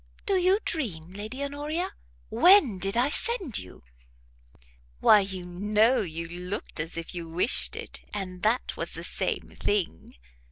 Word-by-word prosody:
"Do 400 - 0
you 370 +1 +3
dream, 180 - -4
Lady 215 +7 -6
Honoria? 295 +5 -3 0.4
when 355 - +5
did 195 +4 +2
I 250 +4 +3
send 385 - +1
you?" 90 -7 -13 1.2
"Why 210 - +7
you 190 -2 -4
know 210 +7 +2
you 165 -3 -5
looked 180 +3 -4
as 165 +2 -4
if 165 - -6
you 170 -2 -6
wished 180 +9 +4
it, - - -7
and 185 -3 -6
that 225 +4 0
was - - -3
the - - -7
same - - -2
thing. 195 - -2
205 Hz, 150 wpm, -27 LUFS, 180-280 Hz, 1.2 s, Why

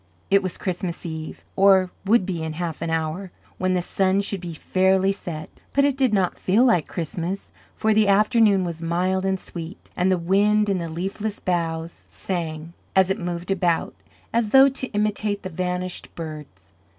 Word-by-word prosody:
It 195 0 +6
was 185 -3 -4
Christmas 180 -2 -4
Eve, 160 -1 -6
or 190 -2 +5
would 205 -1 +4
be 180 -4 -3
in 160 -1 -3
half 165 0 -4
an 165 - -2
hour, 160 +4 -2 0.3
when 185 0 +1
the 180 - 0
sun 190 +1 +1
should 200 -2 -3
be 170 -2 -6
fairly 190 +3 +2
set; 165 -5 -6 0.3
but 280 0 +4
it 285 -2 +2
did 265 -3 +2
not 190 -4 +1
feel 215 +7 +3
like 180 - +3
Christmas, 175 +3 -4 0.2
for 220 0 +2
the 215 -1 +4
afternoon 210 -1 +4
was 170 -1 -5
mild 185 +3 0
and 190 -1 0
sweet, 170 +1 -9
and 185 +1 +2
the 185 - +3
wind 205 +4 +3
in 195 -2 +1
the 170 -1 -4
leafless 195 +5 -4
boughs 165 -2 -2
sang, 165 -3 -4 0.2
as 190 0 +4
it - - -1
moved 175 +1 -4
about, 175 -3 +1 0.4
as 230 -2 +1
though 270 +4 +7
to 265 -1 -4
imitate 210 -1 -1
the 185 - -4
vanished 180 +1 -3
birds. 150 - -9
185 Hz, 180 wpm, -23 LUFS, 170-200 Hz, 0.4 s, though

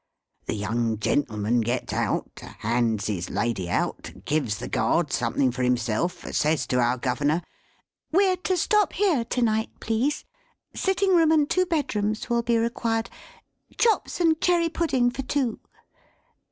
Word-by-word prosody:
The - - -1
young 110 +2 -1
gentleman 110 -1 0
gets 120 +3 -2
out; - - -1
hands 115 -2 -1
his 90 -5 -3
lady 100 -3 -2
out; - - -2
gives 135 -9 0
the 120 - -6
Guard 160 -4 0
something 125 +1 +1
for 125 +1 -5
himself; 125 +8 0
says 150 -4 +1
to 125 0 0
our 120 +1 +2
Governor, 145 +7 0 0.7
"We're 375 +2 +3
to 370 0 -1
stop 420 +4 +2
here 360 - +2
to 245 +2 -2
night, 220 -1 +1
please. 235 +7 -1 0.5
Sitting 385 0 +1
room 325 -2 +5
and 305 -2 +4
two 370 +3 +1
bedrooms 220 - -1
will 235 0 +3
be 235 0 +1
required. 230 0 -1 0.7
Chops 455 -5 +1
and 325 -2 +2
cherry 345 -2 +3
pudding 270 -8 +1
for 270 - -4
two!" 260 -3 -1
210 Hz, 145 wpm, -25 LUFS, -, 0.7 s, room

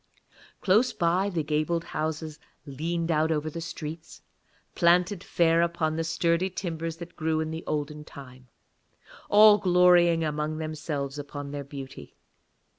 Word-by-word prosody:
Close 215 +6 +3
by, 180 +4 +1
the 170 -5 -2
gabled 155 +3 -1
houses 155 0 -4 0.3
leaned 165 +4 -3
out 160 0 +2
over 155 0 -1
the 165 - -6
streets, 160 0 -8 0.5
planted 175 +2 +2
fair 165 -1 +2
upon 165 -1 0
sturdy 170 +2 0
timbers 165 -3 -4
that 170 0 -10
grew 160 -1 -1
in 160 0 -2
the 160 +1 -6
olden 150 0 -3
time, 130 -3 -13 0.8
all 210 0 +7
glorying 180 -3 +4
among 150 0 -2
themselves 150 -3 -4
upon 145 0 -7
their 145 -1 -5
beauty. 135 - -10
160 Hz, 130 wpm, -27 LUFS, 150-170 Hz, 0.8 s, all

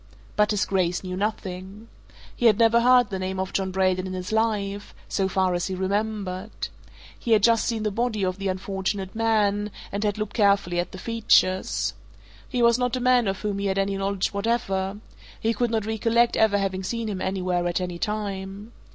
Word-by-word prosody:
But 210 0 +3
his 210 -2 +1
Grace 180 -2 0
knew 185 -1 -4
nothing. 200 0 -4 0.5
He 240 - +3
had 215 -3 +5
never 230 0 +5
heard 245 -2 +5
the 190 - -2
name 185 0 -3
of 190 0 -3
John 190 -1 0
Braden 185 0 +1
in 185 - -5
his 185 +1 -5
life 205 -2 -1
so 195 -2 0
far 190 -1 +1
as 175 0 -1
he 190 - -3
remembered. 200 0 -3 0.5
He 230 - +1
had 210 -2 +4
just 230 -1 +4
seen 225 -2 -1
the 210 - 0
body 220 -2 0
of 185 +1 -2
the 195 - -2
unfortunate 190 0 -3
man 210 -2 +1 0.2
and 200 +1 -2
had 205 0 0
looked 215 -1 -3
carefully 200 -5 +2
at 175 0 -2
the - - -8
features. 190 -3 +2 0.6
He 245 -2 0
was 235 +1 +5
not 250 0 0
a - - -1
man 250 -2 +3
of 195 0 -2
whom 205 -2 -2
he 200 - -1
had 190 0 0
any 195 0 +1
knowledge 195 0 -1
whatever 200 -2 -1 0.4
he 225 +1 +1
could 240 +2 0
not 220 -2 -1
recollect 230 +2 +2
ever 220 -2 +3
having 195 -1 -1
seen 230 +3 -3
him 195 -3 -3
anywhere 180 -2 -1
at 175 - 0
any 180 -1 -4
time. 205 0 -4
200 Hz, 200 wpm, -25 LUFS, 190-220 Hz, 0.6 s, had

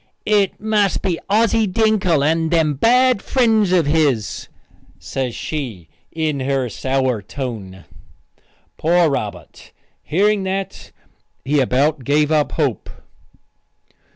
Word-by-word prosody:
"It 205 -2 +1
must 210 -2 0
be 180 -4 -1
Ossy 220 +1 +2
Dinkle 190 -7 +1
and 160 +2 +1
them 160 -3 +2
bad 245 - +3
friends 220 -7 +2
of 175 -4 +3
his," 145 -8 0 0.5
says 120 - -4
she, 115 - -6 0.2
in 155 -3 -2
her 135 -1 -1
sour 130 -1 -1
tone. 100 -6 -7 0.9
Poor 170 -1 +2
Robert! 105 -7 -6 0.3
Hearing 205 +5 +1
that, 190 0 -5 0.5
he 145 +2 +1
about 135 +2 +1
gave 150 +4 +1
up 150 -2 +1
hope. 140 -8 -2
155 Hz, 110 wpm, -19 LUFS, 135-195 Hz, 0.9 s, bad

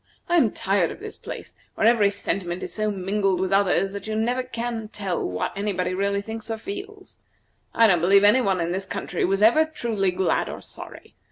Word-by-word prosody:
I 345 - +3
am 255 -9 +4
tired 195 -4 0
of - - -8
this 430 +1 -8
place, - - -8 0.2
where - - +1
every 225 -3 +5
sentiment 190 -3 -3
is - - -5
so 215 -1 0
mingled 195 -1 0
with 190 0 -1
others 195 0 +2
that 200 +1 -7
you 220 - -3
can 220 +1 +1
never 250 +2 0 0.5
tell 195 -4 -2
what 90 0 -2
anybody 195 -3 -1
really 200 +1 0
thinks 225 +1 -7
or 225 - -2
feels. 400 - -8 0.6
I 230 - +6
don't 180 -6 +4
believe 195 +3 +5
any 210 +6 +6
one 195 -5 +1
in 170 0 -1
this 190 +1 -3
country - - -3
was 195 +2 +1
ever 240 +9 +6
truly 230 -11 -1
glad 185 +1 0
or - - -6
sorry. - - -10
200 Hz, 205 wpm, -24 LUFS, 190-225 Hz, 0.6 s, I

